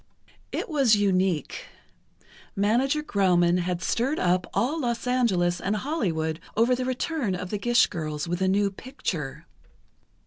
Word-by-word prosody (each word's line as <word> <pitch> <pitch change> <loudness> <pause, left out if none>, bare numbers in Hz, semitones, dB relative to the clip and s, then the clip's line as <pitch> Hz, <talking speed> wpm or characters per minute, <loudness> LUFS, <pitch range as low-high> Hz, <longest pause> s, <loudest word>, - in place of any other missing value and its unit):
It - - -3
was 275 -9 +4
unique. 190 -6 0 0.9
Manager 255 +9 +1
Grauman 180 - +2
had 175 -1 -2
stirred 260 - 0
up 180 0 +1
all 295 +7 0
Los 235 -2 -2
Angeles 190 -9 +1
and 200 +2 0
Hollywood 175 - -2 0.2
over 235 +3 +4
the 250 0 -1
return 255 - -1
of 180 0 -6
the 210 - -2
Gish 240 +2 +4
girls 155 -3 -4
with 175 +2 -2
a 190 - +2
new 200 +1 +2
picture. 190 - -5
200 Hz, 140 wpm, -26 LUFS, 175-250 Hz, 0.9 s, was